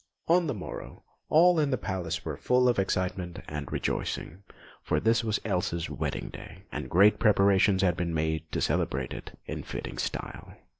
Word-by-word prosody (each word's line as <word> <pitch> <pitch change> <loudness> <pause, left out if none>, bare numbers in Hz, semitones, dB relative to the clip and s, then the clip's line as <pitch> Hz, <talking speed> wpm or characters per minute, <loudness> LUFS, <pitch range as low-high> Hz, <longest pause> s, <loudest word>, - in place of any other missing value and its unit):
On 170 0 +4
the 140 - -1
morrow, 95 - -8 0.3
all 170 +2 +6
in 150 -2 +2
the 130 - +1
palace 85 -6 -3
were 80 -3 -3
full 125 - +2
of 120 -4 +3
excitement 90 -2 -1
and 70 -2 -5
rejoicing, 90 +5 -3 0.4
for - - 0
this 115 +1 +2
was 110 -2 0
Elsa's 90 -4 -1
wedding - - -3
day, 95 - -11
and 75 -3 -5
great 100 +5 +5
preparations 100 -1 +4
had 90 -2 +3
been 85 -1 -1
made 80 0 -1
to - - -1
celebrate 65 -2 0
it - - -9
in - - -5
fitting - - -6
style. - - -5
95 Hz, 170 wpm, -28 LUFS, 85-110 Hz, 0.4 s, all